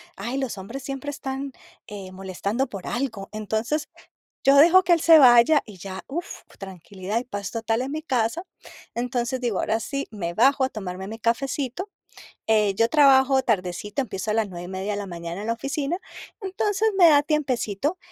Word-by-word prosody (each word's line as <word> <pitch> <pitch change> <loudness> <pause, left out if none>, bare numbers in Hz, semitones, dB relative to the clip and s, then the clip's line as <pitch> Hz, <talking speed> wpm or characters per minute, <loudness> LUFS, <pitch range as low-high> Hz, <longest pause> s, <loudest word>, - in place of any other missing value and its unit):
Ay, 235 +7 -4
los 265 -6 -3
hombres 230 +8 -7
siempre 275 +1 -5
están, 275 -1 -5 0.4
eh, 195 -3 -8
molestando 195 +7 -3
por 195 -3 -8
algo. 235 -6 -3
Entonces, 220 +8 -2 0.6
yo 275 +1 +6
dejo 340 +6 +7
que 350 -1 +4
él 335 - -1
se 325 0 +8
vaya, 255 +4 +6
y 210 -4 -12
ya, 190 0 -7
uf, 340 +5 -4 0.3
tranquilidad 190 +2 -5
y - - -8
paz 205 -3 -6
total 225 0 -1
en 270 +2 -4
mi 310 - -4
casa. 260 +2 -1 0.5
Entonces, 245 +1 -2
digo, 235 -6 -1
ahora 220 - 0
sí, 275 +5 -4
me 170 -6 -4
bajo 270 +5 +4
a - - +1
tomarme 190 -5 -6
mi 225 +3 -8
cafecito, 265 - -2 0.6
eh, 210 -2 +3
yo 230 +3 +2
trabajo 270 -3 +5
tardecito, 205 +3 -1
empiezo 210 -3 -3
a - - -1
las 220 -2 +1
9:30 185 +3 -5
de 205 - -3
la 205 - -5
mañana 170 0 -6
en - - -5
la 230 - +1
oficina, 275 +6 -2 0.4
entonces, 415 +2 0
me 350 -3 +8
da 290 -2 +6
tiempecito. 290 - -1
235 Hz, 180 wpm, -24 LUFS, 200-275 Hz, 0.6 s, se